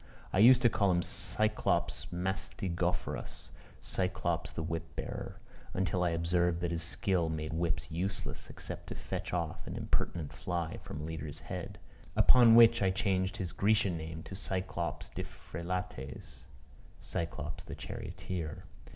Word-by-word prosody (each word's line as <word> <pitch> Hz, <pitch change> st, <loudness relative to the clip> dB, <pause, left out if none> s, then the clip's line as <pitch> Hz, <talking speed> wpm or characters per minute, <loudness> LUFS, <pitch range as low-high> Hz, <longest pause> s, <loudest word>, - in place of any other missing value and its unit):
I -, -, +3 dB
used 125 Hz, +3 st, +8 dB
to -, -, +8 dB
call 100 Hz, -3 st, +3 dB
him 90 Hz, -1 st, +3 dB
Cyclops 105 Hz, +6 st, 0 dB
mastigophorus, 90 Hz, -1 st, -2 dB, 0.3 s
Cyclops 90 Hz, -3 st, 0 dB
the 80 Hz, -, -3 dB
whip 80 Hz, 0 st, -4 dB
bearer, -, -, -5 dB, 0.4 s
until 95 Hz, -1 st, +1 dB
I 90 Hz, -, +3 dB
observed 85 Hz, +1 st, +2 dB
that 85 Hz, -1 st, 0 dB
his 85 Hz, -1 st, -1 dB
skill 90 Hz, 0 st, +1 dB
made 80 Hz, -1 st, -3 dB
whips 85 Hz, -1 st, 0 dB
useless, 95 Hz, +5 st, -3 dB
except -, -, -7 dB
to -, -, -5 dB
fetch -, -, -4 dB
off 85 Hz, -3 st, -2 dB
an -, -, -4 dB
impertinent 80 Hz, -5 st, -1 dB
fly 85 Hz, -2 st, -2 dB
from 70 Hz, -, -7 dB
a -, -, -5 dB
leader's 80 Hz, -1 st, -4 dB
head; 90 Hz, +4 st, -5 dB, 0.4 s
upon 120 Hz, -3 st, +8 dB
which 115 Hz, -2 st, +8 dB
I 95 Hz, -, +4 dB
changed 95 Hz, 0 st, +1 dB
his 95 Hz, -5 st, -2 dB
Grecian 100 Hz, -3 st, +3 dB
name 80 Hz, 0 st, -5 dB
to -, -, -8 dB
Cyclops 85 Hz, -4 st, -2 dB
diphrélates 90 Hz, -5 st, -5 dB, 0.5 s
(Cyclops 80 Hz, -2 st, -3 dB
the -, -, -7 dB
charioteer.) 85 Hz, -5 st, -5 dB
90 Hz, 140 wpm, -33 LUFS, 80-95 Hz, 0.5 s, used